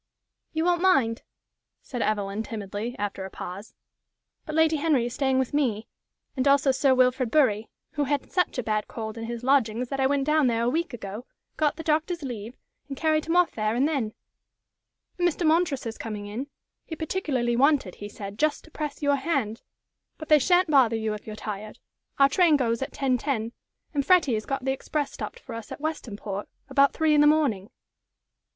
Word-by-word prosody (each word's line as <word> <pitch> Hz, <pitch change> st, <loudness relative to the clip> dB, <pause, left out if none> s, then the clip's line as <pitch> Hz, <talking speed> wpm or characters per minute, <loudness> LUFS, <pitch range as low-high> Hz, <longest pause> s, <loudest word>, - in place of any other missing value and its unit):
"You 320 Hz, +1 st, -1 dB
won't 350 Hz, -1 st, +2 dB
mind," 270 Hz, -12 st, +3 dB, 0.6 s
said 245 Hz, -3 st, -5 dB
Evelyn, 205 Hz, -1 st, -1 dB
timidly, 215 Hz, +2 st, -5 dB
after 205 Hz, -1 st, -3 dB
a 190 Hz, -, -6 dB
pause; 190 Hz, +3 st, -8 dB, 0.7 s
"but 310 Hz, -, -4 dB
Lady 320 Hz, 0 st, +4 dB
Henry 290 Hz, -5 st, +2 dB
is 240 Hz, -, -4 dB
staying 265 Hz, -1 st, +1 dB
with 260 Hz, 0 st, 0 dB
me, 240 Hz, -7 st, 0 dB, 0.5 s
and 260 Hz, 0 st, 0 dB
also 280 Hz, 0 st, +5 dB
Sir 265 Hz, 0 st, +3 dB
Wilfrid 255 Hz, -1 st, +3 dB
Bury, 225 Hz, -7 st, +2 dB, 0.2 s
who 295 Hz, -2 st, -1 dB
had 285 Hz, 0 st, -2 dB
such 360 Hz, -6 st, 0 dB
a 250 Hz, -, -1 dB
bad 215 Hz, -1 st, -1 dB
cold 220 Hz, -2 st, -6 dB
in 225 Hz, -1 st, -5 dB
his 235 Hz, +1 st, -5 dB
lodgings 250 Hz, -3 st, +2 dB
that 275 Hz, -, -3 dB
I 265 Hz, -, +4 dB
went 275 Hz, 0 st, +1 dB
down 305 Hz, -2 st, +3 dB
there 230 Hz, -1 st, +1 dB
a 235 Hz, -, +2 dB
week 335 Hz, +3 st, -1 dB
ago, 215 Hz, +2 st, -7 dB, 0.3 s
got 300 Hz, -2 st, +1 dB
the 325 Hz, -, -7 dB
doctor's 320 Hz, +2 st, 0 dB
leave, 235 Hz, -2 st, -6 dB, 0.3 s
and 275 Hz, -2 st, -6 dB
carried 310 Hz, 0 st, +1 dB
him 330 Hz, +2 st, 0 dB
off 355 Hz, -1 st, +4 dB
there 215 Hz, 0 st, -1 dB
and 265 Hz, +4 st, +3 dB
then. 260 Hz, -9 st, -1 dB, 1.1 s
And 350 Hz, -, +4 dB
Mr. 345 Hz, +1 st, -3 dB
Montresor's 310 Hz, -8 st, +1 dB
coming 210 Hz, -2 st, -5 dB
in. 225 Hz, +7 st, -5 dB, 0.4 s
He 320 Hz, -, -7 dB
particularly 290 Hz, -8 st, -1 dB
wanted, 270 Hz, -, +3 dB
he 205 Hz, -, -8 dB
said, 200 Hz, 0 st, -8 dB
just 310 Hz, -1 st, +1 dB
to 320 Hz, -, -18 dB
press 300 Hz, -1 st, -5 dB
your 285 Hz, 0 st, +3 dB
hand. 265 Hz, -7 st, -1 dB, 0.6 s
But 310 Hz, -, -9 dB
they 305 Hz, -1 st, +7 dB
sha'n't 355 Hz, +3 st, +3 dB
bother 255 Hz, -5 st, +5 dB
you 220 Hz, -1 st, -1 dB
if 210 Hz, -, -8 dB
you're 215 Hz, -, -6 dB
tired. 210 Hz, 0 st, -6 dB, 0.4 s
Our 275 Hz, -, +7 dB
train 330 Hz, 0 st, +4 dB
goes 235 Hz, -3 st, 0 dB
at 270 Hz, -, -3 dB
10.10, 255 Hz, -3 st, -1 dB, 0.4 s
and 285 Hz, -2 st, +1 dB
Freddie 310 Hz, -4 st, +4 dB
has 215 Hz, -1 st, -2 dB
got 270 Hz, -1 st, -3 dB
the 265 Hz, -, +2 dB
express 285 Hz, +2 st, -2 dB
stopped 480 Hz, -, -7 dB
for -, -, -10 dB
us 230 Hz, -2 st, -8 dB
at -, -, -6 dB
Westonport 215 Hz, -10 st, -4 dB, 0.2 s
about 280 Hz, 0 st, +4 dB
three 315 Hz, -1 st, +2 dB
in 295 Hz, -, +5 dB
the 295 Hz, -, +6 dB
morning." 270 Hz, -10 st, +2 dB
265 Hz, 195 wpm, -26 LUFS, 225-305 Hz, 1.1 s, they